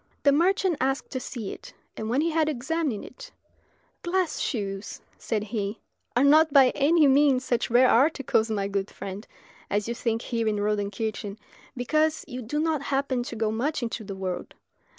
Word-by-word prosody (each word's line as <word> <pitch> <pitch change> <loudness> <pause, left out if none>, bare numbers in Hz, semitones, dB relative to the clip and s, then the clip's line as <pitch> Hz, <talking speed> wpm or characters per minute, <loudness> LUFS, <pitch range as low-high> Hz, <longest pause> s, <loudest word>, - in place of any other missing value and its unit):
The 285 - +6
merchant 355 +2 +2
asked 270 +1 -1
to 260 - -2
see 235 -5 -6
it, - - -12 0.2
and 220 0 -4
when 255 +5 +2
he 330 +1 +1
had 315 -1 +2
examined 285 -2 -2
it - - -12 0.7
"Glass 355 -2 0
shoes," 200 -5 -3 0.2
said 215 -2 -2
he, 210 0 -3 0.4
"are 245 - +4
not 310 +2 +6
by 270 -3 +6
any 305 +2 +4
means 270 -2 +4
such 240 -2 0
rare 245 +2 +5
articles, 250 -3 +3
my 200 -2 -1
good 200 0 -2
friend, 195 +2 -8 0.4
as 205 +1 0
you 235 - -1
think 230 -1 -2
here 230 -2 -1
in 215 - +1
Rodenkirchen, 205 0 -2 0.4
because 310 +5 +1
you 255 -3 -6
do 250 +6 -3
not 315 -2 0
happen 275 -2 -1
to 240 -1 -6
go 220 -1 0
much 260 +5 -1
into 230 -1 -3
the 195 -1 -6
world. 185 -2 -5
245 Hz, 175 wpm, -26 LUFS, 215-295 Hz, 0.7 s, The